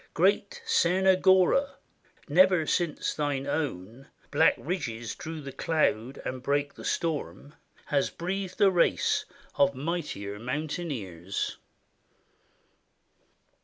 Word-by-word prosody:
Great 485 -1 +1
Tsernogora! 190 - +4 0.5
never 180 +1 +5
since 170 -1 0
thine 145 -2 -1
own 135 - -4 0.2
Black - - +4
ridges 120 - -4
drew 160 0 -7
the 140 -1 -7
cloud 130 -6 0
and 130 0 -4
brake 145 +2 0
the - - -12
storm 150 -2 -3 0.3
Has 140 -2 +1
breathed 185 +2 -4
a 195 -1 +6
race 175 -2 +2 0.3
of 140 -1 +4
mightier 130 - -4
mountaineers. 125 - -4
150 Hz, 95 wpm, -28 LUFS, 130-180 Hz, 0.5 s, a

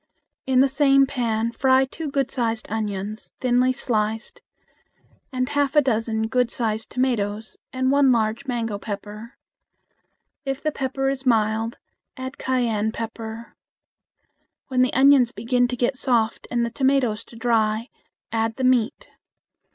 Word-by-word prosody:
In 260 -1 +4
the 275 - +5
same 275 0 +4
pan 230 -4 -1
fry 260 +2 +3
two 300 +3 -6
good 275 -1 -1
sized 230 -3 -1
onions, 210 -1 -4
thinly 250 0 +3
sliced, 225 -4 -2 0.9
and 255 -1 -1
half 285 -1 0
a 295 - +7
dozen 225 -3 0
good 245 +1 +1
sized 220 -2 -2
tomatoes 220 -4 -1
and 260 0 0
one 280 -1 +5
large 230 +3 0
mango 230 -5 -2
pepper. 210 +3 -7 1.1
If 270 -1 -3
the 310 - +1
pepper 270 -1 -2
is 270 -1 -3
mild, 225 0 +1 0.4
add 260 +1 -7
cayenne 230 -5 0
pepper. 225 0 -7 1.1
When 255 -1 +2
the 255 - +3
onions 265 -2 +5
begin 245 +3 +1
to 250 - -3
get 245 +2 0
soft 235 -4 0
and 240 -1 0
the 235 - -4
tomatoes 255 -4 +1
to - - -15
dry, 225 0 +1 0.4
add 225 0 0
the 260 - -4
meat. 255 - +1
240 Hz, 140 wpm, -23 LUFS, 220-265 Hz, 1.1 s, a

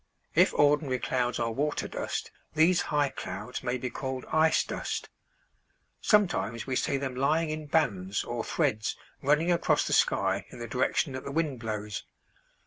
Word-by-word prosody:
If - - +5
ordinary 145 -2 +3
clouds 125 -1 0
are 115 -1 0
water 145 +6 -1
dust - - -4 0.2
these 170 +3 +5
high 145 -2 +2
clouds 105 +5 -6
may 125 +1 -1
be 125 0 -4
called 130 0 -4
ice 160 0 +4
dust. - - -4 0.9
Sometimes 175 - +2
we 130 - -2
see 140 - +1
them 135 -2 -3
lying 155 +5 +1
in 155 -1 -5
bands 105 - +1
or 120 -1 -3
threads 110 +1 0 0.2
running 150 +5 +3
across 170 - +2
the - - -1
sky - - +2
in - - -11
the 120 0 -6
direction 130 +4 0
that 130 - -5
the 140 - -5
wind 150 -4 -1
blows. 105 -2 -4
130 Hz, 160 wpm, -29 LUFS, 120-150 Hz, 0.9 s, If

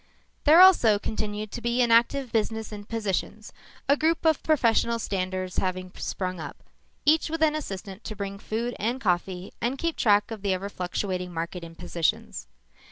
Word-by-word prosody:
There 320 +4 +8
also 290 - +7
continued 210 0 -4
to 240 - -6
be 235 +2 +2
an 235 - +1
active 240 +2 +3
business 220 0 -1
in 205 -1 -8
positions, 210 -1 -3 0.3
a 280 - +5
group 320 +2 0
of 320 -2 +3
professional 235 -6 +2
standers 185 -3 -3
having 185 0 -2
sprung 185 -2 -4
up, 145 -3 -7 0.5
each 315 +2 +4
with 325 0 -1
an 305 -1 +4
assistant 200 -8 -6
to 215 - -5
bring 200 -1 -5
food 235 +4 -3
and 235 +5 -1
coffee 180 -3 -1
and 245 +4 -1
keep 335 +2 -1
track 205 0 +3
of 220 -3 -6
the 195 -1 +1
ever 195 +2 -5
fluctuating 180 -1 -3
market 170 +1 -4
in 165 0 -10
positions. 165 - -2
210 Hz, 170 wpm, -26 LUFS, 185-240 Hz, 0.5 s, There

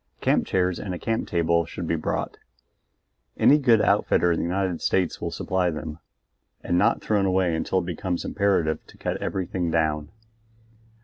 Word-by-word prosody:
Camp - - +1
chairs 90 -1 0
and 95 -3 -4
a - - -5
camp 115 +4 -2
table 85 -1 +2
should 85 +1 -6
be 80 - 0
brought 80 - -3 1.0
any 150 - +5
good 120 -6 +4
outfitter 90 -3 +3
in 85 - 0
the - - -1
United 90 -1 -1
States 90 -3 0
will - - -2
supply 90 -1 -1
them 80 -1 -6 0.6
and 85 - 0
not 105 +6 +2
thrown 100 -2 +1
away 90 -3 +1
until 80 +3 -1
it 90 - 0
becomes 90 +1 -3
imperative 95 -6 +1
to - - -17
cut - - -2
everything 90 -2 -2
down. 75 -2 0
90 Hz, 170 wpm, -25 LUFS, 85-95 Hz, 1.0 s, any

